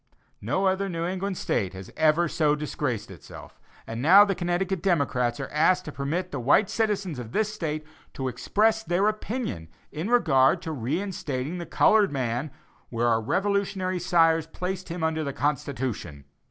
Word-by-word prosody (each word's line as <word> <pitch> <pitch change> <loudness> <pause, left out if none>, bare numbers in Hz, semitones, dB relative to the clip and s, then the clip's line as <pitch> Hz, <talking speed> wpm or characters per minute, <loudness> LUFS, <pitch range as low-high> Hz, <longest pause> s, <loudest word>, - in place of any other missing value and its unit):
No 195 - 0
other 190 +1 +1
New 165 -1 -3
England 190 +1 -3
State 95 -2 -1
has 95 0 -9
ever 155 +2 +3
so 155 -2 +2
disgraced 145 -8 -3
herself; 85 -6 -12 0.3
and 115 +1 -5
now 190 +8 +8
Connecticut 185 -1 -1
democrats 140 -9 +1
are 135 - -4
asked 180 +5 +2
to 150 - -6
permit 150 +6 -3
the 140 - -3
white 145 - +3
citizens 200 - -1
of 115 -2 -8
this 215 0 0
State 155 -6 -4 0.3
to 130 - -3
express 210 - +1
their 190 0 +1
opinion 215 - -3 0.2
in 160 +7 -4
regard 140 - +4
to 165 - -4
re 135 0 -2
instating 165 -5 -4
the 170 - -6
colored 210 +3 +4
man 130 +1 -2 0.4
where 120 0 0
our 115 -1 +2
Revolutionary 190 - -1
sires 165 -2 +3
placed 180 +2 -5
him 170 0 -4
under 160 0 0
the 140 -2 -3
Constitution. 125 - -3
160 Hz, 165 wpm, -26 LUFS, 135-190 Hz, 0.4 s, now